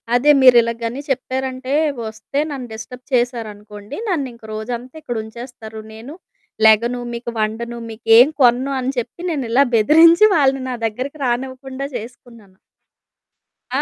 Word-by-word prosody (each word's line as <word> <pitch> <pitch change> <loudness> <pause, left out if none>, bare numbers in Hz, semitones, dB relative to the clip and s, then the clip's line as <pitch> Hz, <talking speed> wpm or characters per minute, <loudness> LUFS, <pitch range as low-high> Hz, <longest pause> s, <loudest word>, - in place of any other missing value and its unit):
అదే 280 +5 +5
మీరిలగ 240 -2 +6
గని 240 +5 -4
చెప్పారంటే 260 0 -3 0.3
ఒస్తే 225 +6 -5
"నన్ను 260 -3 -6
డిస్టర్బ్ 245 +3 -10
చేశారనుకోండి. 215 -2 -3
నన్నింక 270 - -3
రోజంతా 240 +4 -6
ఇక్కడుంచేస్తారు. 225 -2 -7
నేను 235 +8 -10 0.5
లెగను, 235 +3 +3
మీకు 235 0 -5
వండను. 230 +2 -3
మీకేం 225 +3 +5
కొనను" 255 +2 +3
అని 260 +1 -1
చెప్పి 245 +7 -4
నేనిలా 270 -4 +2
బెదిరించి 330 - +6
వాళ్ళని 270 -3 +2
నా 250 - -3
దగ్గరకి 255 +7 -6
రానివ్వకుండా 260 +2 -3
చేసుకున్నాను. 230 -4 -11 1.2
ఆ! - - +2
245 Hz, 115 wpm, -19 LUFS, 225-265 Hz, 1.2 s, మీరిలగ